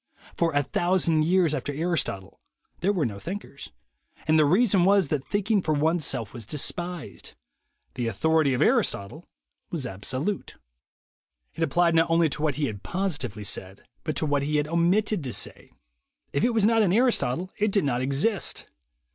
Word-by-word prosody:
For 170 -1 +1
a 145 - +3
thousand 170 -1 +1
years 175 -2 +3
after 145 - -2
Aristotle 145 - -2 0.4
there 190 +4 +2
were 180 -7 0
no 100 -4 -4
thinkers; 170 - -7 0.6
and 155 0 +4
the 155 - +5
reason 190 +3 +4
was, 195 -4 +4
that 145 -3 -2
thinking 205 0 +1
for 155 -3 0
oneself 145 -7 0
was 120 -3 -6
despised. 165 - -5 0.6
The 120 -2 -3
authority 155 +5 +2
of - - +2
Aristotle 100 - 0 0.4
was 155 -6 -3
absolute. 130 - -3 1.0
It - - -8
applied 170 +2 +2
not 165 0 +3
only 165 -1 +3
to 145 - -4
what 150 -3 +1
he 150 - 0
had 105 -6 -5
positively 140 - -2
said, 95 0 -4 0.2
but 155 -2 -3
to 155 - +1
what 145 -1 +1
he 150 +2 -1
had 150 0 +1
omitted 175 +4 +1
to 125 -4 -4
say. - - -4 0.6
If 140 - 0
it - - +4
was 215 -3 +3
not 225 0 +4
in 195 -5 +3
Aristotle, 185 - +1
it 210 0 +2
did 200 -2 +2
not 125 -3 0
exist. 145 - -1
160 Hz, 170 wpm, -26 LUFS, 135-185 Hz, 1.0 s, the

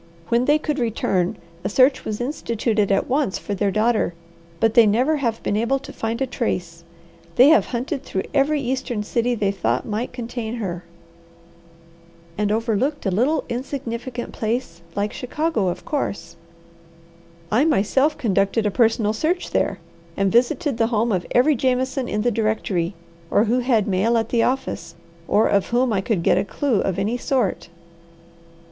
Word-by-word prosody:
When 235 +2 +2
they 295 +2 +4
could 300 -1 -2
return, 195 -6 0 0.3
a - - -1
search 260 +6 +3
was 210 -1 -3
instituted 230 -5 -1
at 195 - +2
once 270 -6 0
for 205 - -5
their 200 +1 0
daughter, 215 -3 +1 0.4
but 225 0 +2
they 230 -2 +7
never 255 +9 +2
have 235 -5 -2
been 205 - 0
able 235 +5 +1
to 270 - -10
find 225 +1 -3
a - - +1
trace. 180 -9 -3 0.5
They 255 +4 +7
have 315 - +5
hunted 260 +3 -3
through 190 -8 -3
every 290 +1 +2
eastern 255 -4 -2
city 240 +3 0
they 200 -3 0
thought 125 - -1
might 220 +3 -3
contain 240 -2 -5
her." 180 -6 -4 1.5
"And 210 +1 0
overlooked 230 +6 0
a 195 - +1
little 255 - +1
insignificant 245 -1 -5
place 220 -6 -3
like 205 +1 -1
Chicago, 280 - -1
of 175 - -3
course." 200 - -3 1.2
"I 230 +6 +4
myself 285 0 +2
conducted 210 -3 +1
a 210 - +1
personal 225 -1 +2
search 335 +10 -1
there, 195 - 0 0.4
and 195 -1 +2
visited 250 +3 +2
the 225 - +3
home 230 0 +1
of 185 -3 -1
every 265 +5 +4
Jameson 260 +1 0
in 210 0 -1
the 245 - +2
directory 205 -5 -1 0.3
or 205 - +3
who 235 +3 +1
had 240 -5 +2
mail 210 +5 +2
at 225 0 -1
the 235 - +2
office 255 -9 -2 0.3
or 215 - +3
of 200 -1 +2
whom 245 0 +1
I 195 - +1
could 190 -4 -1
get 180 - +4
a - - +1
clue 235 +2 0
of 190 - -1
any 220 +5 0
sort." 240 - -1
230 Hz, 165 wpm, -22 LUFS, 205-255 Hz, 1.5 s, they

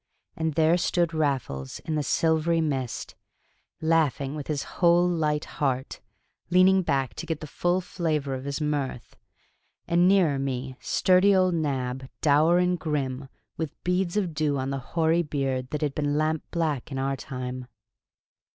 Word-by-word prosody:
And 160 -2 -2
there 160 +1 +4
stood 170 -1 +1
Raffles 135 - -2
in 160 - -4
the 150 - +1
silvery 160 +3 +1
mist, 135 -6 -2 0.7
laughing 155 -4 +1
with 150 -2 -6
his 150 -3 -2
whole 175 0 +3
light 155 -3 0
heart, 135 -4 -2 0.5
leaning 185 +2 +5
back 135 -6 0
to 170 - -7
get 160 -2 -2
the - - -7
full 175 +5 0
flavor 155 -6 -2
of 130 0 -5
his 140 +1 -3
mirth; 145 -5 -3 0.7
and, 175 +1 +4
nearer 180 -8 +3
me, 130 -1 -3
sturdy 190 +2 +3
old 185 -1 +3
Nab, 130 -5 -2
dour 155 +4 +4
and 180 0 +1
grim, 135 -4 -3 0.3
with 160 -3 -4
beads 180 +1 0
of 185 -6 0
dew 150 -2 0
on 135 +1 -2
the 135 - -2
hoary 160 +5 +1
beard 135 -5 -2
that 150 0 -3
had 145 -2 0
been 145 0 0
lamp 155 0 +1
black 155 -6 -2
in 135 - -3
our 135 +1 0
time. 125 -2 -6
150 Hz, 160 wpm, -26 LUFS, 135-170 Hz, 0.7 s, leaning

